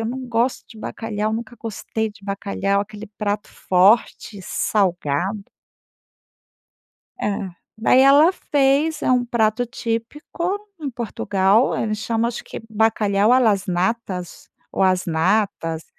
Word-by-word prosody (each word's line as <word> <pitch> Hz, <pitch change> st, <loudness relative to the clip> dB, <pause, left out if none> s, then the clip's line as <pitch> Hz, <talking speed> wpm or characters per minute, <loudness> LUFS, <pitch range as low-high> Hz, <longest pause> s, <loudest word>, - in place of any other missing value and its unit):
eu 225 Hz, -, -2 dB
não 255 Hz, +2 st, -5 dB
gosto 235 Hz, +2 st, 0 dB
de 225 Hz, -, -13 dB
bacalhau, 215 Hz, -1 st, -3 dB
nunca 230 Hz, +1 st, -5 dB
gostei 220 Hz, 0 st, -4 dB
de 205 Hz, -, -19 dB
bacalhau, 200 Hz, 0 st, -1 dB
aquele 210 Hz, +1 st, -10 dB
prato 205 Hz, -1 st, -2 dB
forte, 200 Hz, +2 st, +2 dB
salgado”. 185 Hz, 0 st, -1 dB, 1.7 s
É, 200 Hz, -2 st, -2 dB, 0.3 s
daí 230 Hz, +3 st, +4 dB
ela 285 Hz, +5 st, +7 dB
fez, 290 Hz, 0 st, +1 dB
é -, -, +1 dB
um 250 Hz, -1 st, +3 dB
prato 230 Hz, 0 st, +1 dB
típico 295 Hz, -, -3 dB, 0.2 s
em 285 Hz, -, -3 dB
Portugal, 210 Hz, -2 st, +1 dB
ele 215 Hz, -1 st, -1 dB
chama 225 Hz, +2 st, -1 dB
acho 240 Hz, -, -5 dB
que -, -, -8 dB
bacalhau 215 Hz, -1 st, +2 dB
a 255 Hz, -, +6 dB
las 210 Hz, -5 st, +2 dB
natas 185 Hz, 0 st, -3 dB, 0.2 s
ou -, -, 0 dB
as 185 Hz, -1 st, +3 dB
natas, 165 Hz, -1 st, 0 dB
220 Hz, 130 wpm, -21 LUFS, 200-235 Hz, 1.7 s, ela